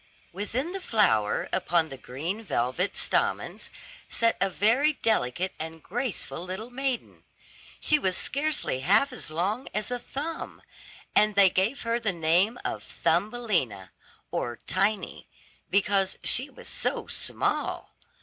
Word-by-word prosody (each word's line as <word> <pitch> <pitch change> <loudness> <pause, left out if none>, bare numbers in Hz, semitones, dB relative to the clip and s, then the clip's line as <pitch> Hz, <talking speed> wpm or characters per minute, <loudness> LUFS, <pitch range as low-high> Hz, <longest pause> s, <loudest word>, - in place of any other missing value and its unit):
Within 230 - -2
the 390 0 -4
flower, 110 - +2
upon 165 -2 +2
the 135 - -7
green 160 - -4
velvet 175 - -1
stamens, - - 0 0.4
sat 230 0 +2
a 195 - +3
very 240 +11 +3
delicate 185 - 0
and 160 0 -6
graceful 235 -5 -3
little 190 +6 -5
maiden. 265 0 -3 0.6
She 305 - +4
was 185 -8 +1
scarcely 285 - 0
half 205 - +3
as 245 - -4
long 195 +11 -1
as 210 +3 -1
a 245 - -1
thumb, 300 +7 -6 0.5
and 210 -1 +5
they 195 -2 +7
gave 200 +10 +1
her 230 0 0
the 220 -4 0
name 175 +7 +3
of - - -2
"Thumbelina," 175 - 0 0.4
or 120 -1 -2
Tiny, 195 0 0 0.4
because 195 0 +2
she 260 +4 +1
was - - -11
so - - 0
small. - - -1
205 Hz, 130 wpm, -27 LUFS, 175-245 Hz, 0.6 s, they